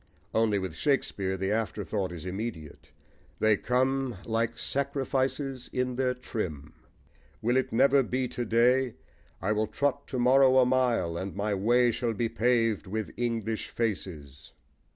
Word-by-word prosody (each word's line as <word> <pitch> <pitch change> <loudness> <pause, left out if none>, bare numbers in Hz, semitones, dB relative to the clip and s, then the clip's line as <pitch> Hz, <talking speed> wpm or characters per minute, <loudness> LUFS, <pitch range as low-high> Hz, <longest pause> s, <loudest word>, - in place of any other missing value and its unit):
Only, 110 -2 +2
with 95 -4 -3
Shakespeare, 100 - 0
the 95 +1 -1
afterthought 105 -3 -2
is 85 -1 -8
immediate: 90 -5 -6 0.5
They 110 -1 +4
come 130 +2 0
like 115 0 -1
sacrifices 135 -1 -2
in 125 -1 -1
their 125 0 0
trim. 85 - -5 0.7
Will 120 +3 +1
it 130 - +1
never 140 +4 +5
be 130 0 -1
to 120 - -3
day? 120 +2 +3 0.5
I 100 - +1
will 110 0 +1
trot 140 +3 -1
to 130 - -4
morrow 130 +1 +5
a 130 - +6
mile, 120 -10 +1
and 95 +1 -5
my 105 +1 -1
way 120 +5 +3
shall 115 0 -1
be 115 +1 -1
paved 115 -3 +1
with 110 +3 -3
English 115 -2 -2
faces. 80 - -4
115 Hz, 145 wpm, -28 LUFS, 100-130 Hz, 0.7 s, a